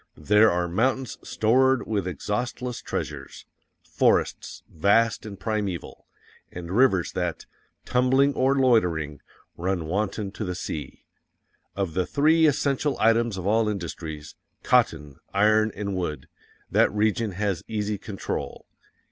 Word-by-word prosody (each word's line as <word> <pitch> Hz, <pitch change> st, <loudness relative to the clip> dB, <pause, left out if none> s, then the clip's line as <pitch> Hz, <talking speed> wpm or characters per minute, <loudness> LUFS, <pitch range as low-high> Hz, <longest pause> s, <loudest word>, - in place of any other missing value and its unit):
THERE 105 Hz, +8 st, +4 dB
ARE 85 Hz, 0 st, 0 dB
MOUNTAINS 125 Hz, +7 st, -1 dB
STORED 130 Hz, +4 st, +2 dB
WITH 100 Hz, -4 st, -2 dB
EXHAUSTLESS 120 Hz, -, -3 dB
TREASURES: 70 Hz, -1 st, -6 dB, 0.4 s
forests -, -, 0 dB
vast 105 Hz, +6 st, +2 dB
and 100 Hz, -2 st, -9 dB
primeval; 100 Hz, -4 st, -4 dB, 0.4 s
and 90 Hz, -1 st, -7 dB
rivers 110 Hz, -8 st, +3 dB
that, 90 Hz, -3 st, -3 dB, 0.4 s
tumbling 130 Hz, +3 st, +3 dB
or 135 Hz, +1 st, +2 dB
loitering, 90 Hz, -, +2 dB, 0.4 s
run 90 Hz, -1 st, -2 dB
wanton 100 Hz, +3 st, -2 dB
to 110 Hz, -, -6 dB
the 90 Hz, -3 st, -3 dB
sea. 75 Hz, -5 st, -6 dB, 0.7 s
Of 95 Hz, -5 st, -2 dB
the 90 Hz, +1 st, 0 dB
three 160 Hz, +3 st, +4 dB
essential 140 Hz, 0 st, 0 dB
items 115 Hz, -1 st, +2 dB
of 95 Hz, -, -5 dB
all 110 Hz, +2 st, +2 dB
industries 80 Hz, -6 st, -6 dB, 0.3 s
cotton, 75 Hz, -3 st, +1 dB, 0.2 s
iron 110 Hz, +2 st, +4 dB
and 100 Hz, -2 st, -3 dB
wood 85 Hz, -5 st, -4 dB, 0.4 s
that -, -, +4 dB
region 105 Hz, 0 st, 0 dB
has 100 Hz, -2 st, -1 dB
easy 105 Hz, -2 st, -2 dB
control. 100 Hz, -3 st, -5 dB
105 Hz, 120 wpm, -25 LUFS, 90-115 Hz, 0.7 s, THERE